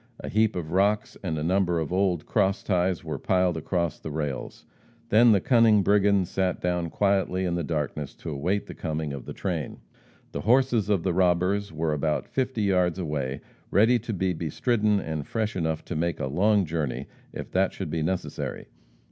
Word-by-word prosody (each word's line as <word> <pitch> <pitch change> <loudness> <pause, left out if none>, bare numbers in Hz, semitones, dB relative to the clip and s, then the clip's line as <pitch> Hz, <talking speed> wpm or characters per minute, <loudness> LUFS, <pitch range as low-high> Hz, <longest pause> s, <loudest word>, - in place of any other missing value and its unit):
A - - -6
heap 110 +1 +2
of 80 -3 -4
rocks 100 +3 +1
and 80 -5 -2
a 75 - -2
number 90 0 +1
of 80 +1 -2
old 90 -4 +1
cross 95 +3 +1
ties 90 -2 0
were - - -4
piled 90 -2 +1
across 85 0 -2
the - - -6
rails. 75 -3 -4 0.4
Then 115 +2 +6
the 100 - +5
cunning 115 -2 +4
brigands 100 -1 +3
sat 95 0 -1
down 90 -1 -1
quietly 95 -1 +1
in 90 - -1
the 85 -1 -1
darkness 75 -2 -3
to - - -7
await 90 +9 -1
the - - -8
coming 80 -3 -3
of 70 -3 -7
the - - -6
train. - - -3 0.5
The - - -4
horses 120 -3 +3
of 100 -5 +2
the 95 - 0
robbers 90 +2 +2
were 80 0 -1
about 75 +1 -1
fifty 130 -4 -1
yards 90 -3 +2
away 75 -6 -3 0.3
ready 115 +5 +4
to 115 +1 -5
be 95 -2 0
bestridden, 105 - +1
and 80 -5 -4
fresh 110 -1 -2
enough 80 -3 -2
to 90 - -5
make 85 +1 -1
a - - -1
long 100 +8 +2
journey 80 -4 -3 0.3
if - - -7
that - - +2
should - - -6
be 80 - -1
necessary. 90 +4 -3
90 Hz, 190 wpm, -26 LUFS, 80-100 Hz, 0.5 s, Then